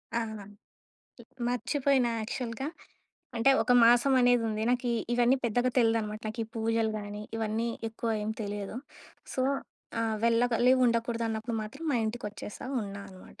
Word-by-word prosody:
ఆ! - - +3 0.2
ల్ - - -9 1.1
మర్చిపోయినా 255 0 +1
యాక్చల్‌గా. 235 +4 -4 0.7
అంటే, 230 +4 +4
ఒక 250 - +2
మాసమనేదుంది. 240 -3 +4
నాకీ 245 -1 +1 0.2
ఇవన్నీ 245 +2 +4
పెద్దగా 245 +2 +2
తెలీదనమాట. 225 -2 +1
నాకీ 225 +1 -3
పూజలు 225 0 0
గానీ, 205 0 -6
ఇవన్నీ 225 +1 -1 0.2
ఎక్కువ 225 +1 -3
ఏం 215 - -2
తెలియదు. 205 +2 -5 0.6
సో 255 - 0 0.6
ఆ! - - +1 0.2
వెళ్ళగలి 240 +1 +4
ఉండకూడదన్నప్పుడు 230 -1 0
మాత్రం 275 +10 -8
మా - - +2
ఇంటికొచ్చేశా 215 0 -6 0.2
ఉన్నా 200 0 -7
అనమాట. 185 0 -15
230 Hz, 120 wpm, -29 LUFS, 220-245 Hz, 1.1 s, అంటే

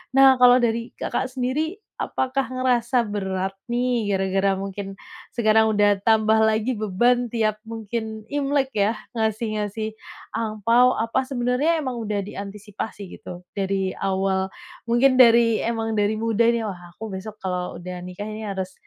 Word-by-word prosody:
Nah, 265 -1 +7
kalau 250 0 +7
dari 230 0 -1
Kakak 260 - -2
sendiri, 260 +7 -2 0.2
apakah 265 +1 -2
ngerasa 250 -2 +1
berat 190 -2 -2 0.2
nih, 240 -3 0
gara-gara 195 0 +1
mungkin 195 0 -6 0.3
sekarang 220 -2 +3
udah 205 -1 +3
tambah 220 -1 +4
lagi 220 +3 +2
beban 240 +4 +1
tiap 215 -2 0
mungkin 220 -1 -5
Imlek 280 -2 0
ya, 210 +2 +2 0.2
ngasih-ngasih 220 -1 -2 0.4
angpao. 230 +3 +3
Apa 230 +4 +1
sebenarnya 260 +5 +1
emang 260 -4 -3
udah 210 -2 -2
diantisipasi, 205 +1 -7 0.2
gitu, 180 0 -9
dari 195 -1 -1
awal 190 0 0 0.4
mungkin 255 +3 +4
dari 230 -1 +5
emang 225 -1 -1
dari 210 +1 +1
muda 225 0 +1
nih, 230 -2 0
"Wah, 185 -4 -5 0.2
aku 220 -3 -6
besok 210 +3 -7
kalau 180 -3 -3
udah 180 0 -7
nikah 180 +3 -7
ini, 215 0 -6
harus 190 -1 -4
220 Hz, 140 wpm, -23 LUFS, 200-240 Hz, 0.4 s, Nah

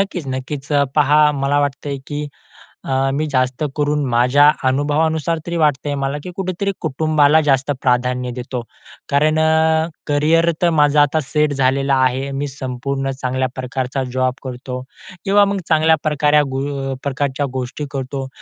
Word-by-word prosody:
नक्कीच, 195 -5 -2
नक्कीच. 135 +2 -5
अ, 145 -1 +4
पहा 150 +1 +5
मला 140 +1 0
वाटतं 145 0 -2
आहे 140 - -3
की 145 0 -4 0.6
अ, 135 0 +1
मी 150 +2 -1
जास्त 130 +2 0
करून 150 0 +1
माझ्या 125 +5 +5 0.2
अनुभवानुसार 155 +4 +1
तरी 170 0 -3
वाटतं 145 -2 +1
आहे 145 - -1
मला, 140 +1 -2
की 180 - -7
कुठेतरी 195 +1 -2
कुटुंबाला 155 0 +3
जास्त 140 -1 +1
प्राधान्य 125 0 0
देतो. 125 0 -4 0.5
कारण 155 +2 +2
अ, 160 0 +3 0.2
करिअर 160 +3 +3
तर 175 - +4
माझं 145 0 +4
आता 145 +2 +3
सेट 150 -1 +1
झालेलं 135 +1 +1
आहे. 130 +1 +1
मी 140 +1 -3
संपूर्ण 135 0 -4
चांगल्या 130 0 0
प्रकारचा 130 +1 -3
जॉब 130 -1 +1
करतो 125 0 -6 0.4
किंवा 200 +1 +5
मग 195 - -2
चांगल्याप्रकारे 155 -2 +3
गो 135 0 -3
प्रकारच्या 140 0 -1
गोष्टी 130 +3 -4
करतो. 135 0 -4
145 Hz, 150 wpm, -19 LUFS, 130-150 Hz, 0.6 s, पहा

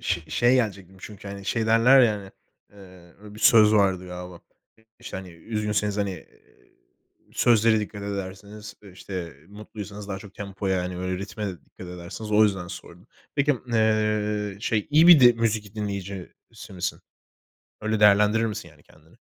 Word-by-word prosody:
ş 85 -5 -3
şeye 120 +10 +3
gelecektim 95 -6 -2
çünkü, 105 0 -10
hani, 100 0 -8
şey, 110 +3 -1
derler, 115 +4 +6
ya, 115 -4 +4
hani, 100 -2 -8 0.9
eee, 105 0 -11
bir 110 - -11
söz 110 -2 +6
vardı 95 -3 +2
galiba. 90 -1 -9 0.4
İ - - -25 0.2
işte, - - -8
hani, 95 -1 -8
üzgünseniz, 105 +3 -2
hani, 100 -1 -1
eee, 95 - -15 0.6
sözlere 115 -2 +3
dikkat 105 -1 -7
ederseniz, 100 +1 -7
e, 100 -3 -14
işte 90 -5 -7
mutluysanız 105 0 -9
daha 95 -1 -4
çok 100 -1 -13
tempoya, 95 -2 -3
hani, 90 0 -5
böyle 90 0 -3
ritme 105 +2 -5
de 95 - -3
dikkat 90 - -13
ederseniz. 90 +5 -8
O 105 +1 +5
yüzden 95 -4 -1
sordum. 90 +3 -11 0.3
Peki 145 +1 +2
m 130 - -6 0.2
eee, 105 -2 0
şey, 110 -2 -1
iyi 155 +3 +6
bir 170 -5 +9
di 120 -1 +8
müzik 110 -3 -2
dinleyicisi 100 +1 -7
misin? 90 -1 -4 0.8
Öyle 110 0 -1
değerlendirir 105 +2 +5
misin 105 -5 -6
yani 75 -1 -21
kendini? 80 +5 -23
105 Hz, 165 wpm, -25 LUFS, 95-110 Hz, 0.9 s, bir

